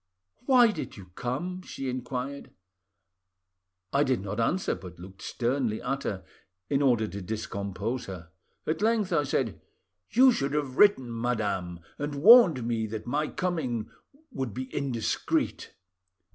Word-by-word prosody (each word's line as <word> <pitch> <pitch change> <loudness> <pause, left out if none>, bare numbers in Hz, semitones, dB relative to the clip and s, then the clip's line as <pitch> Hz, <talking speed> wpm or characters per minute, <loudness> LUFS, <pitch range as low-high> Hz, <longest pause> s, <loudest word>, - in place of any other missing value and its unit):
"'Why 245 -4 +6
did 165 - -6
you 95 -2 -12
come?' 165 - -3
she 135 -6 -6
inquired. 130 +2 -4 1.4
"I 140 +1 +4
did 130 -3 +1
not 105 +3 -4
answer, 175 +11 +1
but 90 -2 -9
looked 95 +2 -12
sternly 120 -2 -1
at 135 +2 -2
her, 95 -2 -3 0.5
in 140 0 +2
order 120 -6 +3
to 100 0 -6
discompose 105 +3 -4
her. 85 -4 -8 0.3
At 155 - -1
length 215 -4 +2
I 150 -3 +2
said— 130 -4 -1 0.5
"'You 260 +2 +6
should 140 - -1
have 145 -3 -2
written, 130 - +4
madame, 100 -8 -1 0.2
and 145 0 -3
warned 170 - +7
me 115 -2 -1
that 110 0 -6
my 150 +5 0
coming 145 -13 -2 0.4
would 130 -6 -4
be 130 0 -6
indiscreet. 130 -5 -1
130 Hz, 140 wpm, -28 LUFS, 110-150 Hz, 1.4 s, warned